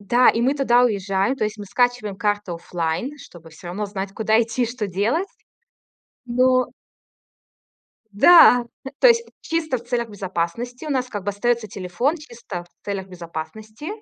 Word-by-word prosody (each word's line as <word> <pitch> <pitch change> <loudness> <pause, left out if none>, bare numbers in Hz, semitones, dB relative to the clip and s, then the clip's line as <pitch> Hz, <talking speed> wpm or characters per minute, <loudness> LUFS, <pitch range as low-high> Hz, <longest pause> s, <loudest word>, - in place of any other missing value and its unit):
да, 240 +5 +4
и 230 - +3
мы 265 +3 +2
туда 250 -3 +3
уезжаем, 195 +1 0
то 215 - -1
есть 215 +1 -3
мы 205 - -8
скачиваем 245 -1 0
карту 205 -3 -1
офлайн, 170 - -3
чтобы 170 - -14
всё 160 +2 -11
равно 205 +4 -3
знать, 195 -1 -5
куда 220 +1 +2
идти 230 +2 -2
и - - -2
что 230 -2 -4
делать. 220 - 0 1.0
Но 255 +1 +2 1.4
Да, 245 - +7 0.3
то - - +7
есть 465 0 +4 0.2
чисто 320 -5 -1
в 235 - -10
целях 240 -2 -2
безопасности. 205 - -4
У - - -5
нас, 255 -3 0
как 205 -3 -5
бы, 205 - -1
остается 230 +2 0
телефон, 200 - -1
чисто 235 - -8
в 175 - -30
целях 195 -2 -4
безопасности, 185 - -8
220 Hz, 165 wpm, -22 LUFS, 195-250 Hz, 1.4 s, Да